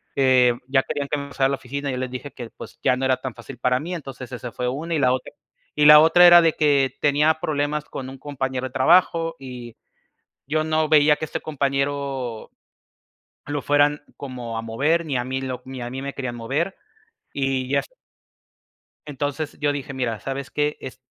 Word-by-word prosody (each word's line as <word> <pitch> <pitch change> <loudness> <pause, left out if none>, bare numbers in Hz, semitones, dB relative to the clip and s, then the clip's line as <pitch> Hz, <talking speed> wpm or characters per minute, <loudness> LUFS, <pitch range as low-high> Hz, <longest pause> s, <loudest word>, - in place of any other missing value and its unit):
eh, 130 -2 +4
ya 135 0 +2
querían 140 -1 -3
que 150 - 0
me 140 0 -5
pasara 135 -1 +1
a - - -2
la 140 - 0
oficina 140 +2 -5
y 130 - -2
yo - - -3
les 130 -1 -3
dije 135 +3 -7
que, 120 -2 -8
pues, - - -12
ya 125 - +3
no 135 - -4
era 130 -1 +2
tan 130 -2 -6
fácil 125 +1 -10
para 125 +1 +2
mí, 175 +3 -5
entonces 135 -4 -8
esa 125 -1 -6
fue 125 - -3
una 160 +6 -4
y - - +1
la 130 -2 +3
otra 130 - -5 0.5
y 150 - +5
la 150 0 +10
otra 165 +3 +7
era 175 0 +9
de 165 -1 +3
que 140 -3 +2
tenía 150 +2 +3
problemas 150 0 -1
con 130 -1 -7
un 135 - -10
compañero 130 -2 -3
de 130 - -15
trabajo 165 +3 +3
y 125 -3 -9 0.7
yo 155 +2 0
no 155 0 +1
veía 150 -1 +5
que 155 - -4
este - - -5
compañero 140 -4 -2 1.0
lo 145 -1 -3
fueran 145 0 +2 0.2
como 125 -4 -6
a - - -4
mover, 150 +9 0
ni 140 - -1
a 125 - -1
mí 130 +1 -3
lo 130 -1 -5
ni 130 -1 -7
a 120 - -4
mí 130 +2 -5
me 140 0 -4
querían 130 -3 -4
mover 145 +11 -2 0.6
y 135 -2 -1
ya 140 - +3
f - - -12 1.2
Entonces 145 +1 -4
yo 145 -1 +1
dije: 140 -1 -5
"Mira, 120 -4 -2
¿sabes 135 0 -5
qué? 150 0 -1
Es 130 0 -9
135 Hz, 210 wpm, -23 LUFS, 130-150 Hz, 1.2 s, la